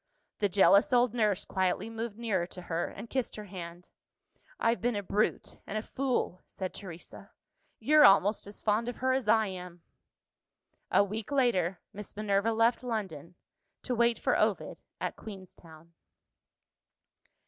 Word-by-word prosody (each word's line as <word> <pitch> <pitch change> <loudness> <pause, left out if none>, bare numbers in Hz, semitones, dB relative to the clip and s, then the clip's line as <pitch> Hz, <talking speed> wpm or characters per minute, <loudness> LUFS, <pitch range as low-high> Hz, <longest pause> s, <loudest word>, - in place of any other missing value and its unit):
The 205 - +2
jealous 200 +1 +5
old 245 -2 +3
nurse 215 -5 +1
quietly 185 +2 -1
moved 225 -1 -5
nearer 200 -7 -1
to 180 - -9
her, 170 0 -2
and - - -9
kissed 260 0 -2
her 210 - -7
hand. 175 -2 -9 0.7
"I've 230 +1 +1
been 245 -1 0
a 205 - -2
brute 205 +3 -1
and 215 - -3
a 215 - -3
fool," 255 -9 -2
said 185 -1 -5
Teresa; 175 -4 -10 0.5
"you're 305 0 +5
almost 200 +1 +5
as 205 - -11
fond 220 +3 +1
of 245 - -5
her 260 +1 0
as 260 -4 -1
I 220 0 +4
am." 180 -3 -8 1.1
A - - +5
week 215 +5 -5
later, 195 -10 +1
Miss 205 0 -9
Minerva 210 +1 +1
left 230 +2 +2
London, 190 - -5 0.5
to 255 - -2
wait 235 0 +2
for - - +1
Ovid - - 0 0.2
at - - -3
Queenstown. 170 -5 -12
210 Hz, 150 wpm, -30 LUFS, 185-230 Hz, 1.1 s, jealous